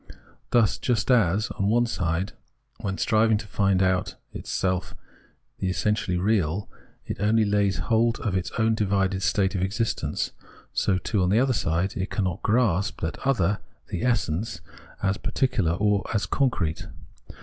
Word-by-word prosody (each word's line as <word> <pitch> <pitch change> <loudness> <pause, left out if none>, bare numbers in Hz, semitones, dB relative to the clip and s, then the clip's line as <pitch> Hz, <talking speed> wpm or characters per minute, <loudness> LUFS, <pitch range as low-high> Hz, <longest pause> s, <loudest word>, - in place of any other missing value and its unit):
Thus, 115 -3 +3
just 120 0 +1
as, 105 -3 +3
on 100 - +2
one 120 +3 +3
side, 90 -4 -1 0.5
when 95 -1 -3
striving 110 0 +3
to 105 - -6
find 100 -2 +2 0.5
itself 95 -1 -2
in - - -17 0.6
the 95 - -1
essentially 95 -1 0
real, 95 -1 +1 0.4
it - - -4
only 110 +2 +3
lays 100 -3 +1
hold 115 +6 +1
of 100 -4 -1
its 95 -1 -1
own 110 0 +3
divided 95 -3 0
state 95 0 +1
of 95 - -1
existence, 105 +4 -1 0.4
so, 95 -2 +2
too, 100 +3 -1
on 90 - +2
the 105 +4 +4
other 130 0 +2
side, 85 -1 0
it 95 +2 -2
cannot 95 -5 -2
grasp 105 -5 +1
that 80 - -3
other 105 -7 +2 0.3
[the - - -3
essence] 100 -8 0 0.4
as 95 +1 +1
particular 100 -11 0
or 100 +1 +1
as 105 0 +1
concrete. 95 - 0
100 Hz, 150 wpm, -25 LUFS, 95-110 Hz, 0.6 s, the